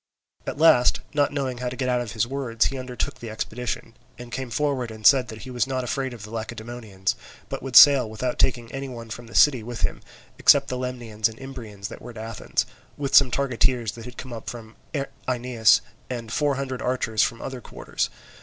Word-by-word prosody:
At - - -3
last, 145 -6 +5
not 145 -1 +2
knowing 135 -4 -2
how 125 0 -2
to 125 - -6
get 130 -1 -2
out 125 -1 +2
of 115 -4 -5
his 110 -1 +1
words, 125 -3 0
he 135 - -2
undertook 125 -2 -4
the 115 - -7
expedition, 115 +1 -4 0.2
and 120 -1 -10
came 130 0 -4
forward 130 -1 0
and 110 -1 -10
said 130 -3 +7
that 110 0 -9
he 130 - -8
was 125 +1 0
not 130 -1 -1
afraid 130 +2 -2
of 115 -4 -9
the 105 - -9
Lacedaemonians, 110 -3 -4 0.3
but - - -4
would 130 -1 -6
sail 140 -6 +9
without 120 +3 -3
taking 120 -3 +1
any 135 0 -5
one 115 -3 -8
from 120 +1 -7
the - - -12
city 135 -5 +6
with 120 +1 -6
him, - - -1 0.4
except 140 -1 +6
the 125 - -2
Lemnians 120 -4 -1
and 110 - -12
Imbrians 115 -7 -7
that - - -10
were - - -9
at 115 - -10
Athens, 110 0 -2 0.3
with 140 -2 -3
some 140 -2 +8
targeteers 125 -3 +1
that 115 +1 -10
had 125 -1 -10
come 130 -2 -7
up 115 - -6
from 115 -2 -9 0.5
Aenus, 120 -3 +4 0.3
and 115 -2 -5
four 145 -2 +2
hundred 130 -1 -4
archers 125 -3 0
from 115 -1 +1
other 130 -2 -6
quarters. - - -3
125 Hz, 210 wpm, -25 LUFS, 115-130 Hz, 0.5 s, sail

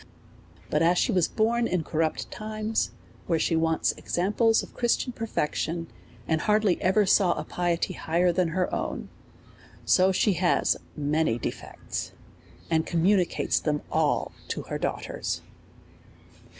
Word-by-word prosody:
But - - +2
as 170 +2 +4
she 245 - +2
was 180 -5 +3
born 230 +1 +1
in 180 -3 0
corrupt 160 0 -1
times, 215 +1 -2 0.4
where 165 - +2
she 165 - +1
wants 160 0 +2
examples 215 +5 +1
of - - -12
Christian 240 +1 0
perfec 225 -10 -2
tion, 165 0 -3 0.4
and 160 -1 +1
hardly 210 -3 +2
ever 195 +3 +3
saw 185 -2 +4
a - - -4
piety 175 -1 -1
higher 175 +2 +1
than 180 0 +1
her 180 +2 -1
own; - - -3 0.8
so 185 +1 +4
she 200 +2 +2
has 175 0 +2 0.2
many 150 -4 +1
defects, - - -5 0.5
and 160 -1 +2
communicates 180 +2 +2
them 150 -1 -1
all - - +1 0.2
to - - -4
her - - -5
daughters. - - -3
180 Hz, 135 wpm, -27 LUFS, 165-210 Hz, 0.8 s, as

